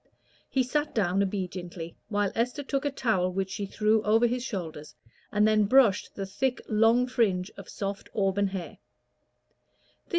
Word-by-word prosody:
He 265 Hz, -, +2 dB
sat 295 Hz, +4 st, -1 dB
down 195 Hz, -3 st, +2 dB
obediently, 180 Hz, -3 st, -4 dB
while 205 Hz, -2 st, 0 dB
Esther 245 Hz, +5 st, -1 dB
took 275 Hz, 0 st, -2 dB
a -, -, +2 dB
towel, 215 Hz, -9 st, +1 dB
which 190 Hz, +1 st, -2 dB
she 200 Hz, 0 st, -3 dB
threw 215 Hz, +2 st, +2 dB
over 220 Hz, +3 st, +3 dB
his 245 Hz, +1 st, 0 dB
shoulders, 165 Hz, -, -6 dB, 0.4 s
and 210 Hz, 0 st, +3 dB
then 215 Hz, -1 st, +4 dB
brushed 225 Hz, -3 st, +4 dB
the 195 Hz, -, -3 dB
thick, 250 Hz, +7 st, -1 dB
long 225 Hz, +3 st, +4 dB
fringe 205 Hz, -7 st, 0 dB
of 195 Hz, -, -11 dB
soft 200 Hz, 0 st, -5 dB
auburn 200 Hz, 0 st, +2 dB
hair. 190 Hz, -3 st, -6 dB
205 Hz, 155 wpm, -28 LUFS, 190-240 Hz, 0.4 s, then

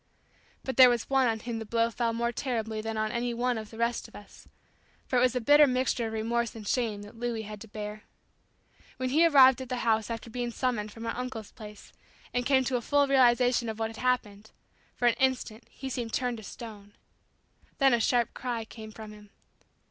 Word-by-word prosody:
But 265 Hz, -, -4 dB
there 255 Hz, -1 st, +10 dB
was 240 Hz, +1 st, -1 dB
one 265 Hz, -2 st, +4 dB
on 225 Hz, -1 st, -1 dB
whom 230 Hz, -1 st, -4 dB
the -, -, -4 dB
blow 230 Hz, +1 st, +1 dB
fell 230 Hz, 0 st, -1 dB
more 235 Hz, +1 st, -1 dB
terribly 225 Hz, -4 st, -3 dB
than 225 Hz, 0 st, -4 dB
on 215 Hz, 0 st, -1 dB
any 235 Hz, 0 st, -2 dB
one 245 Hz, +1 st, 0 dB
of 215 Hz, -1 st, -9 dB
the 225 Hz, -, -12 dB
rest 235 Hz, +1 st, -1 dB
of -, -, -18 dB
us, 205 Hz, -, -14 dB, 0.6 s
for 255 Hz, -, 0 dB
it -, -, +2 dB
was 255 Hz, 0 st, +3 dB
a -, -, +2 dB
bitter 290 Hz, +5 st, +6 dB
mixture 255 Hz, -2 st, 0 dB
of 220 Hz, -, -6 dB
remorse 230 Hz, +1 st, -1 dB
and 215 Hz, -2 st, -9 dB
shame 220 Hz, -5 st, -1 dB
that 210 Hz, +2 st, -13 dB
Louis 235 Hz, -2 st, -2 dB
had 210 Hz, -1 st, -9 dB
to 225 Hz, -, -9 dB
bear. 210 Hz, 0 st, -7 dB, 1.0 s
When 255 Hz, 0 st, -2 dB
he 320 Hz, +6 st, +5 dB
arrived 265 Hz, -4 st, +6 dB
at 260 Hz, -, -8 dB
the 255 Hz, -, -1 dB
house 220 Hz, -1 st, +2 dB
after 230 Hz, 0 st, -6 dB
being 245 Hz, +1 st, -3 dB
summoned 235 Hz, -3 st, -2 dB
from 225 Hz, +2 st, -9 dB
our 230 Hz, -, -3 dB
uncle's 250 Hz, -4 st, -6 dB
place, 210 Hz, -2 st, -12 dB, 0.4 s
and 245 Hz, 0 st, 0 dB
came 265 Hz, -1 st, +4 dB
to 255 Hz, 0 st, 0 dB
a -, -, -4 dB
full 285 Hz, +3 st, +2 dB
realization 245 Hz, -2 st, +3 dB
of 220 Hz, -, -5 dB
what 225 Hz, 0 st, -2 dB
had 225 Hz, -, -12 dB
happened, 220 Hz, -5 st, -1 dB, 0.5 s
for 245 Hz, -, +1 dB
an 235 Hz, -, +5 dB
instant 255 Hz, -3 st, -1 dB
he 270 Hz, -, -8 dB
seemed 240 Hz, -3 st, -4 dB
turned 245 Hz, -2 st, -1 dB
to 220 Hz, -, -10 dB
stone. 205 Hz, -2 st, -10 dB, 0.8 s
Then 270 Hz, -2 st, +4 dB
a 235 Hz, -, +3 dB
sharp 240 Hz, +1 st, +1 dB
cry 240 Hz, -3 st, -4 dB
came 220 Hz, -1 st, -10 dB
from 215 Hz, 0 st, -10 dB
him. 210 Hz, -1 st, -14 dB
235 Hz, 220 wpm, -28 LUFS, 220-250 Hz, 1.0 s, there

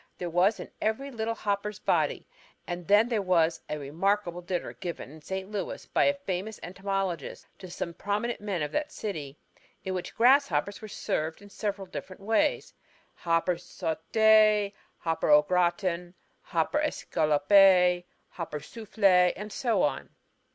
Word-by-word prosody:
there 175 Hz, -1 st, -4 dB
was 185 Hz, +6 st, +3 dB
in -, -, -6 dB
every 270 Hz, +6 st, -1 dB
little 225 Hz, -1 st, -2 dB
hopper's 205 Hz, -1 st, -2 dB
body. -, -, 0 dB, 0.4 s
And 175 Hz, -1 st, -6 dB
there 215 Hz, +2 st, +4 dB
was 170 Hz, -3 st, +2 dB
a 150 Hz, -, -2 dB
remarkable 175 Hz, +5 st, -1 dB
dinner 175 Hz, 0 st, -3 dB
given 170 Hz, -6 st, -6 dB
in 155 Hz, +1 st, -13 dB
St. 190 Hz, +4 st, -5 dB
Louis 200 Hz, -3 st, -4 dB
by -, -, +2 dB
a 285 Hz, -, +3 dB
famous 210 Hz, -5 st, -4 dB
entomologist 190 Hz, -3 st, -3 dB
to 185 Hz, -, -9 dB
some 170 Hz, 0 st, -5 dB
prominent 205 Hz, +6 st, -2 dB
men 195 Hz, -6 st, -2 dB
of 150 Hz, -, -3 dB
that 300 Hz, -, -2 dB
city, 155 Hz, -, -5 dB, 0.5 s
in 190 Hz, -, -2 dB
which 180 Hz, -1 st, -5 dB
grasshoppers 230 Hz, -, +3 dB
were 215 Hz, -, -7 dB
served 160 Hz, -5 st, -3 dB
in 205 Hz, 0 st, -15 dB
several 200 Hz, -1 st, -3 dB
different 185 Hz, +1 st, -9 dB
ways: 225 Hz, +8 st, +1 dB, 0.4 s
hopper 170 Hz, +1 st, 0 dB
sauté, 210 Hz, +5 st, +3 dB, 0.2 s
hopper 165 Hz, -2 st, -1 dB
au 150 Hz, 0 st, +7 dB
gratin, 175 Hz, +1 st, 0 dB, 0.3 s
hopper 170 Hz, -, 0 dB
escalloppé, 180 Hz, -, +4 dB, 0.3 s
hopper 165 Hz, -3 st, -5 dB
soufflé, 190 Hz, 0 st, +2 dB
and 210 Hz, +1 st, -7 dB
so 230 Hz, -8 st, +1 dB
on. 145 Hz, -, -1 dB
190 Hz, 145 wpm, -28 LUFS, 170-210 Hz, 0.5 s, au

